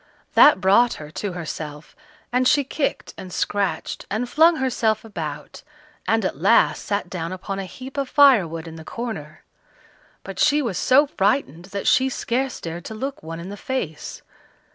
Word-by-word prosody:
That 295 - +7
brought 205 +6 +4
her 150 -1 -10
to 200 +3 -4
herself, 155 -3 -7 0.4
and 250 +1 +2
she 290 0 +4
kicked 275 +2 -3
and 185 - -8
scratched, 200 +2 -2
and 220 +4 -2
flung 325 +6 +5
herself 230 -6 0
about, 155 -8 -7 0.5
and 225 -2 +2
at 155 - -3
last 200 +6 +4
sat 200 -2 -2
down 170 -2 -5
upon 195 +1 -5
a 195 - -4
heap 260 +8 -10
of 275 -2 -1
firewood 190 - +4
in 165 0 -9
the 160 - -9
corner; 180 -8 -6 0.8
but - - -8
she 295 0 +4
was 235 - -2
so 275 +3 +5
frightened 200 - 0
that 200 +1 -5
she 260 +1 +4
scarce 260 +1 -2
dared 170 +1 -7
to 220 - -6
look 270 +5 -5
one 165 +1 -7
in 175 +3 -7
the 205 - -6
face. 195 - -5
205 Hz, 170 wpm, -22 LUFS, 170-260 Hz, 0.8 s, That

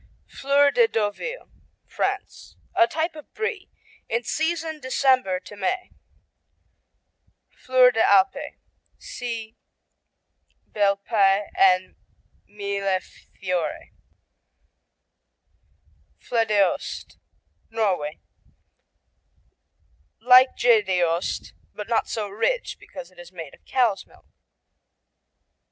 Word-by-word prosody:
Fleur 280 +1 +2
de 475 -2 +4
Deauville 225 - -3 0.4
France - - -4 0.2
A 345 -2 +5
type 320 +1 -2
of 305 - -12
Brie, 435 -3 -3 0.4
in 235 +2 -1
season 320 +4 -2
December 260 -7 +2
to 205 - -12
May. 285 - -2 1.6
Fleur 255 -1 +4
des 225 -2 0
Alpes 195 -3 +3 0.4
see 230 -2 -6 1.2
Bel 200 -1 +2
Paese 200 -1 +2
and 185 -1 +3 0.5
Millefiori. 195 -4 -3 2.3
Floedeost 215 -5 0 0.5
Norway 190 -9 -1 2.0
Like 250 +3 +6
Gjedeost, 185 -7 +1 0.2
but 210 - -6
not 230 -1 0
so 215 -2 -3
rich 485 - -1
because 265 -7 -11
it's 175 -1 -14
made 165 -6 -9
of - - -19
cow's 235 -7 +1
milk. - - -22
220 Hz, 80 wpm, -24 LUFS, 195-265 Hz, 2.3 s, Like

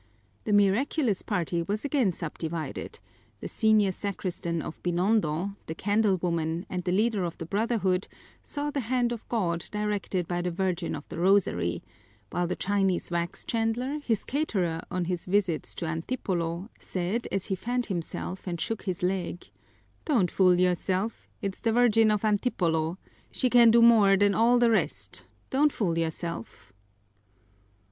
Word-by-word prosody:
The - - -1
miraculous 205 - +2
party 175 -4 -1
was 205 +8 -3
again 270 -8 +2
subdivided: 165 -1 -5 0.4
the - - -5
senior 215 -3 +3
sacristan 180 -3 -3
of 160 - -7
Binondo, 180 0 +1
the 160 - -4
candle 205 +1 +2
woman, 170 0 -1
and 180 -1 -2
the 180 - -1
leader 210 +1 +2
of 170 -1 -4
the 165 - -6
Brotherhood 195 -1 0 0.3
saw 295 0 -4
the 285 - -2
hand 245 0 0
of 235 -2 -6
God 175 -8 0
directed 205 -4 -2
by 175 0 -1
the 180 - -1
Virgin 180 -1 -1
of - - -9
the - - -6
Rosary; 185 - +2 0.5
while 175 0 0
the 180 - -2
Chinese 195 -3 0
wax 170 0 -2
chandler, 240 +5 -1
his 230 -8 -1
caterer 190 - -1
on 180 -1 -1
his 180 0 -3
visits 185 -4 0
to 170 - -4
Antipolo, 170 +1 -2
said, 190 +6 -2
as 195 - -1
he 190 - -1
fanned 245 +5 -2
himself 185 0 -5
and 170 -2 -3
shook 225 +5 -2
his 185 -3 -4
leg: 180 -1 -2 0.5
"Don't 230 - +2
fool 180 -2 +4
yourself 185 +4 0 0.2
it's 195 -1 -3
the 225 - +1
Virgin 225 -2 +5
of 210 0 +1
Antipolo! 175 -7 +1 0.3
She 255 -2 0
can 240 -2 +7
do 230 +1 +6
more 210 -4 +6
than 205 0 +3
all 235 +4 +4
the 240 -1 +4
rest 220 - -1 0.2
don't 290 +3 +4
fool 180 -10 -1
yourself!" 165 - -4
195 Hz, 155 wpm, -28 LUFS, 175-225 Hz, 0.5 s, can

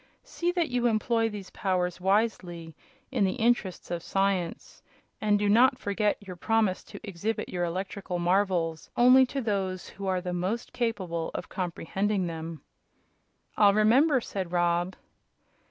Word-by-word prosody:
See 350 0 -2
that 345 -3 0
you 245 -1 +1
employ 225 0 +1
these 205 -3 -8
powers 180 -2 -1
wisely, 185 -5 0 0.4
in 250 -6 +1
the 190 - +2
interests 235 -8 0
of 170 -1 -2
science, 195 -2 -2 0.4
and 210 -1 +3
do 205 0 0
not 235 +6 +5
forget 205 +1 0
your 185 -2 -7
promise 215 -1 +1
to - - -10
exhibit 205 +2 -3
your 175 -1 -1
electrical 185 +1 -4
marvels 175 -2 0
only 255 +2 +7
to 275 +2 -3
those 195 -5 -2
who 195 0 -7
are 185 -1 +1
most 190 +7 -3
capable 185 -9 -2
of - - -5
comprehending 190 +2 -2
them." 165 -1 -6 0.9
"I'll 205 -1 +5
remember," 255 +6 +4
said 190 -5 -5
Rob. 175 +1 +1
195 Hz, 140 wpm, -28 LUFS, 180-225 Hz, 0.9 s, only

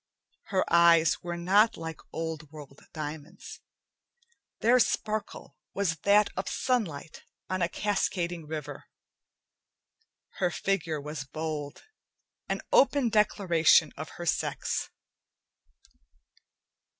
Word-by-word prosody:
Her 190 -2 0
eyes 170 -3 +5
were 175 0 -5
not 205 +6 +3
like 160 -1 -6
old 160 -2 -5
world 145 -3 -12
diamonds; 150 -1 -8 1.0
their 245 +3 +5
sparkle 215 -2 -2 0.2
was 185 -5 0
that 205 +5 +3
of 190 - -3
sunlight 185 - -2 0.3
on 185 0 -1
a 170 - +1
cascading 175 -6 -2
river. 150 -2 -6 1.5
Her 180 - +2
figure 170 -4 -1
was 150 -1 -6
bold, 155 -1 -5 0.7
an - - -2
open 275 -3 +4
declaration 195 -6 +3
of - - -7
her - - -6
sex. - - -1
170 Hz, 100 wpm, -28 LUFS, 155-200 Hz, 1.5 s, eyes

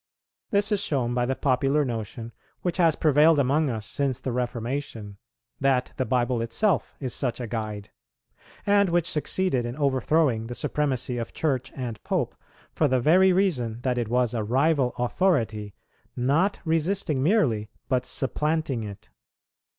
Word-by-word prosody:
This 205 +1 +1
is 205 - +2
shown 125 -5 0
by 120 0 0
the 130 - 0
popular 135 +3 +1
notion 115 -1 -5 0.3
which 175 -2 -1
has 165 -4 +4
prevailed 155 +1 +4
among 140 +2 +2
us 110 -3 -4
since 135 0 -2
the 130 0 -3
Reformation, 120 -3 -4 0.4
that 135 -2 +1
the 130 - -1
Bible 120 0 +1
itself 155 - 0
is 130 -4 -3
such 125 -3 -2
a 120 - -3
guide; 110 -3 -5 0.7
and 200 -1 +4
which 170 -1 +1
succeeded 155 -3 0
in 120 +1 -4
overthrowing 135 -4 +1
the 120 - -6
supremacy 130 -4 -1
of 115 - -5
Church 135 -5 -1
and 120 -6 -5
Pope, - - -1 0.4
for 155 - +2
the 130 -1 +2
very 185 +9 +5
reason 130 - 0
that 125 -1 0
it 120 - -1
was 125 0 +1
a 110 -2 -1
rival 135 +3 +1
authority, 120 - 0 0.4
not 145 +11 +1
resisting 165 -2 0
merely, 130 - +2 0.2
but 130 -2 +1
supplanting 150 -1 -1
it. 100 -2 -9
130 Hz, 150 wpm, -25 LUFS, 120-155 Hz, 0.7 s, very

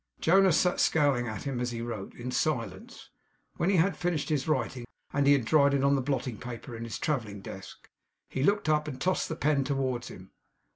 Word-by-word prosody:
Jonas 190 0 +5
sat 180 -1 +2
scowling 140 -6 +2
at 110 - -5
him 135 -3 -3
as 125 0 -1
he 120 -1 -5
wrote, 110 -5 -6
in 125 +1 -5
silence. 120 - -3 0.5
When 170 - +1
he 195 - +3
had 180 +1 +3
finished 175 -3 -1
his 150 -2 0
writing, 130 -4 -1 0.3
and 140 -1 +2
had 140 -4 +4
dried 140 +1 +4
it 135 - +1
on 140 0 +4
the 140 - +2
blotting 125 -4 -2
paper 120 0 -7
in 115 +1 -6
his 115 -3 -5
travelling 110 -9 -2
desk; 95 0 -10 0.4
he 130 - -4
looked 200 +4 +2
up, 150 0 +2
and 130 -4 -6
tossed 185 0 0
the 160 - -3
pen 150 -3 +1
towards 130 -3 -2
him. 95 +1 -11
135 Hz, 205 wpm, -29 LUFS, 120-155 Hz, 0.5 s, Jonas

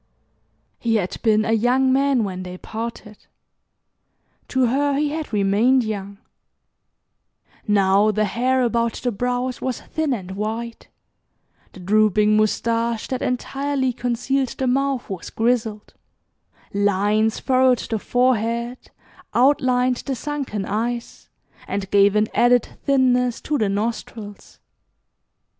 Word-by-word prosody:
He 230 -1 0
had 190 -4 -2
been 215 -1 +3
a - - 0
young 250 +4 +3
man 275 -3 +2
when 185 -2 -4
they 180 0 -7
parted. 220 0 -7 1.2
To 260 -1 +1
her 280 +3 +1
he 295 0 +1
had 310 -2 -5
remained 215 +5 +3
young. 200 -2 -5 1.5
Now 200 0 +3
the 215 0 +1
hair 255 +5 +1
about 235 -1 +1
the 245 - -2
brows 245 +3 -2
was 260 -2 -2
thin 315 -2 -2
and 190 -7 -4
white, 220 +4 -5 0.9
the - - -12
drooping 210 +2 +3
mustache 230 +1 0
that 255 -1 -3
entirely 270 +1 -1
concealed 250 +2 -1
the 265 - -1
mouth 270 0 0
was 190 -4 -6
grizzled; 225 -2 -1 0.8
lines 205 +2 +1
furrowed 255 -1 +3
the 225 -1 -3
forehead, 235 0 0 0.5
outlined 255 -1 +3
the 270 - -4
sunken 265 -7 -4
eyes, 235 +4 -4 0.4
and 195 -1 -4
gave 200 0 +4
an 210 0 +3
added 245 0 +4 0.2
thinness 250 -3 +2
to 300 - -2
the 210 - +1
nostrils. 210 0 -5
235 Hz, 120 wpm, -22 LUFS, 210-255 Hz, 1.5 s, gave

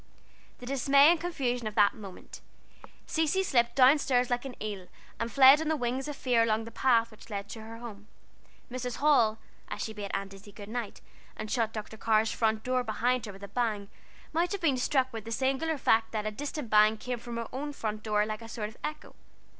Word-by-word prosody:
The 245 - -10
dismay 275 +3 +5
and 345 - +1
confusion 250 -9 -2
of 210 - -6
that 205 -2 +5
moment! 200 -4 -11 0.6
Cecy 320 +4 +1
slipped 235 -8 +2
down 270 +3 +6
stairs 250 -3 +1
like 245 +2 0
an 265 - -6
eel, 200 -4 -5 0.3
and 230 +1 -2
fled 275 +3 +7
on 320 - -2
the 315 - +2
wings 255 0 -2
of 295 - -4
fear 245 -4 +2
along 225 -1 +1
the 230 - -9
path 230 -3 +2
which 215 +1 -16
led 200 -2 -4
to 220 - -8
her 225 +1 -9
home. 215 -3 -10 0.6
Mrs. 250 -1 -4
Hall, 245 -7 +3 0.3
as - - -4
she 220 - -5
bade 205 -2 -6
Aunt 195 0 -4
Izzie 200 +1 -13
good 205 0 -10
night, 235 -2 -5 0.4
and 215 0 -6
shut 230 -3 +1
Dr. 220 0 -7
Carr's 220 0 +2
front 220 -1 0
door 255 0 0
behind 245 +2 0
her - - -6
with 195 +1 -13
a - - -6
bang, 215 -4 -2 0.4
might 340 +3 +1
have 400 - -4
been 295 -6 +3
struck 260 0 +1
with 225 -2 -5
the 230 - -8
singular 270 +6 0
fact 225 -3 +2
that 215 -1 -2
a 215 - -1
distant 285 +1 -5
bang 215 +1 +5
came 245 +2 -4
from 235 0 -7
her 230 -1 -4
own 290 +3 -4
front 215 -6 -4
door 210 -1 +1
like 215 +1 -5
a 225 - -10
sort 215 -3 -4
of 220 - -17
echo. 300 0 -6
235 Hz, 220 wpm, -29 LUFS, 215-265 Hz, 0.6 s, fled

